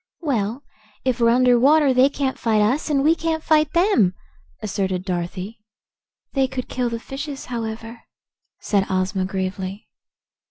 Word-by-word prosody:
"Well, 245 -4 -1 0.4
if 255 -2 0
we're 230 -1 +4
under 245 0 +4
water, 285 +1 +5
they 255 +2 +5
can't 275 -2 -2
fight 220 -2 +2
us, 255 +10 +1
and 280 -2 +2
we 315 +2 +5
can't 325 -1 -2
fight 310 -1 +3
them," 335 - +3 0.4
asserted 190 -2 -2
Dorothy. 185 +4 -4 0.7
"They 270 -2 +2
could 255 -1 -5
kill 250 -1 -1
the 230 0 -4
fishes, 275 +3 -6
however," 225 0 -5 0.6
said 200 -2 0
Ozma 185 0 0
gravely. 190 +1 -4
235 Hz, 145 wpm, -22 LUFS, 200-275 Hz, 0.7 s, water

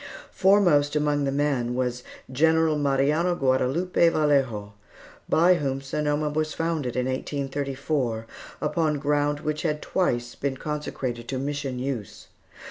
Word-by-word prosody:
Foremost 175 -7 +4
among 150 -1 +1
the 135 - 0
men 135 -4 0
was 125 -1 -1 0.3
General 160 +3 +3
Mariano 145 +5 +1
Guadalupe 140 +6 +2
Vallejo, 135 -10 +1 0.6
by 175 +3 +5
whom 135 -5 -1
Sonoma 150 +2 -1
was 155 0 -1
founded 160 -7 -2
in 125 -1 0
1834, 135 -2 -2 0.4
upon 155 -3 0
ground 145 +1 0
which 155 0 -2
had 150 -3 -1
twice 120 -12 -1
been 135 -1 -3
consecrated 130 -6 -4
to 130 - -3
Mission 140 -1 -3
use. 125 -5 -5
145 Hz, 125 wpm, -25 LUFS, 130-155 Hz, 0.6 s, by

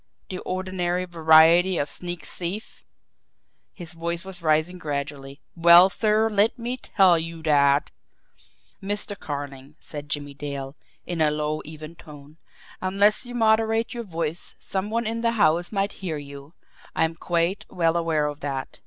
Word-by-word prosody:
The 185 - -5
ordinary 185 -1 -2
variety 165 +2 +5
of 145 - 0
sneak 175 +2 -5
thief!" 185 +5 -5 0.9
His 175 -4 -8
voice 170 +2 -4
was 190 -2 -4
rising 160 +3 +1
gradually. 140 -2 -5
"Well, 170 +2 +7
sir, 215 +1 +2
let 215 +3 +2
me 240 +1 -3
tell 190 -8 +3
you 165 0 -6
that 140 -2 +3 0.5
" - - -31
"Mr. 205 0 -3
Carling," 140 -1 -7
said 145 -1 -9
Jimmie 145 -1 -4
Dale, 140 -1 -6 0.3
in 170 -2 -3
a 155 - +4
low, 150 0 -2
even 155 +1 -9
tone, 150 -1 -14 0.4
"unless 200 +5 +2
you 245 - -7
moderate 225 0 +2
your 240 -1 -5
voice 165 -4 -2
some 190 +1 -3
one 230 +1 -1
in 230 +1 -2
the 230 0 +1
house 175 -5 +2
might 200 -1 0
hear 170 -5 -3
you 140 +1 -11 0.4
I - - +2
am 160 0 0
quite 170 +3 -1
well 165 -2 +1
aware 165 -3 +1
of 145 0 -4
that. 135 -2 -5
170 Hz, 155 wpm, -24 LUFS, 150-190 Hz, 0.9 s, Well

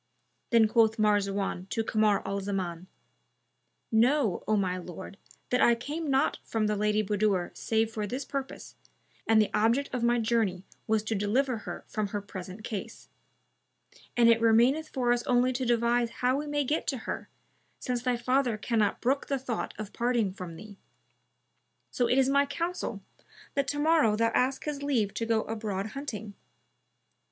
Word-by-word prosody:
Then 230 -3 +5
quoth 225 0 +3
Marzawan 200 -3 0
to 225 - -1
Kamar 215 -2 +2
al 200 0 -1
Zaman, 185 -3 -4 1.0
"Know, 235 -2 +2
O 215 - +3
my 185 -2 0
lord, 185 +3 -9 0.3
that 250 - +2
I 235 - +6
came 295 +6 -4
not 270 0 +2
from 220 -1 -1
the 210 0 +1
Lady 210 +1 +1
Budur 205 -3 0
save 225 0 0
for 210 -2 -3
this 255 +5 -4
purpose, 275 -1 -6 0.5
and 225 -1 +5
the 215 - +2
object 235 +7 +1
of 250 - -1
my 240 +1 +3
journey 220 -5 0 0.2
was 220 -1 +2
to 220 - -2
deliver 225 +5 0
her - - -7
from 215 -2 -2
her 205 +1 -3
present 195 0 -9
case; 210 -4 -6 1.1
and 235 -1 +6
it 230 -1 +5
remaineth 245 +8 +4
for 245 -2 +1
us 240 - 0
only 250 0 +3
to 255 +1 -2
devise 235 0 +2
how 250 +2 0
we 295 +1 -4
may 290 0 0
get 295 +4 -1
to 270 - 0
her, - - -5 0.5
since 250 -2 -2
thy 245 -1 0
father 250 -1 +1
cannot 215 -1 0
brook 270 +3 0
the 275 - 0
thought 250 -4 -3
of 215 -1 -7
parting 235 -5 0
from 180 -3 -8
thee. 205 +3 -11 1.1
So 245 - +1
it 250 - +3
is 265 -1 +4
my 280 +1 +3
counsel 335 +5 -3 0.5
that 280 -1 0
to 290 - -2
morrow 300 -8 +3
thou 230 +1 +2
ask 265 +2 +1
his 295 -2 -4
leave 240 -8 0
to 230 - -3
go 225 -1 +2
abroad 215 -3 -3
hunting. 220 -6 -6
230 Hz, 170 wpm, -29 LUFS, 210-255 Hz, 1.1 s, I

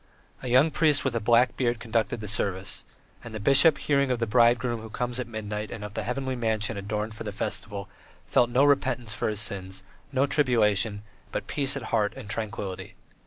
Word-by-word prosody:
A - - -6
young 130 +6 +4
priest 150 -4 +2
with 130 -3 0
a - - +1
black 120 +3 +3
beard 120 -2 0
conducted 115 0 -1
the 105 - -6
service; 95 -3 -2 0.4
and 115 -2 -8
the - - -4
bishop, 140 +6 +6
hearing 140 -2 +1
of 125 - +1
the 115 - -1
Bridegroom 120 0 +3
who 110 - -9
comes 125 +2 -3
at 125 - -3
midnight 105 -1 -5
and 105 - -7
of 105 -1 -7
the - - -3
Heavenly 130 +1 -3
Mansion 110 -2 0
adorned 105 +2 -3
for 110 - -8
the 105 - -4
festival, 100 0 -4 0.4
felt 120 - +3
no 125 +3 +3
repentance 130 -5 +1
for 105 - -1
his 105 -1 0
sins, 95 -2 -2 0.3
no 135 0 +2
tribulation, 110 -7 +2 0.3
but - - -3
peace 140 -1 -1
at 135 - -6
heart 105 -1 +2
and - - -9
tranquillity. 105 -4 -5
115 Hz, 200 wpm, -26 LUFS, 105-125 Hz, 0.4 s, bishop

